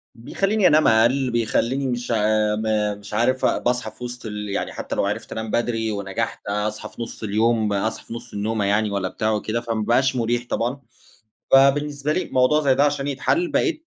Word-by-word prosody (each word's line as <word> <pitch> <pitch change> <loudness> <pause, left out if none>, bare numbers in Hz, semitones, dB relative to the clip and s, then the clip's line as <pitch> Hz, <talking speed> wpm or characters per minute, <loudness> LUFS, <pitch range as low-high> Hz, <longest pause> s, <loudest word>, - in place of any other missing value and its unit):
بيخَلّيني 195 - +1
أنام 155 +1 +4
أقل، 120 +4 +3
بيخَلّيني 120 +3 0
مش 120 -1 -3
عا 110 -1 +2
م 105 -1 -1
مش 105 +1 -11
عارف 125 +4 +1
أ - - +2
باصحى 125 0 -1
في - - -12
وسط 125 0 -7
ال 105 -1 -5
يعني 100 - -3
حتى - - -5
لو - - +1
عرفت - - -4
أنام 110 -1 -4
بدري، 115 -2 0
ونجحت 100 -2 -4
أصحى 105 +1 -2
في - - -10
نص 115 - -7
اليوم، 110 0 +1
أصحى 105 +3 -2
في - - -8
نص 120 +1 -9
النومة 105 0 -1
يعني 105 +1 +1
والَّا 100 -2 -1
بتاع 110 +3 -1
وكده، 110 +2 -1
فما 115 -2 -2
بقاش 130 +3 +2
مريح 120 0 0
طبعًا. 125 +4 -2 0.7
فبالنسبة 140 +2 +3
لي، 185 - -1
موضوع 130 +4 +3
زي 135 -3 +3
ده 140 - +4
عشان 145 -1 0
يتحل 310 - 0
بقيت 320 +1 0
115 Hz, 195 wpm, -22 LUFS, 110-130 Hz, 0.7 s, أنام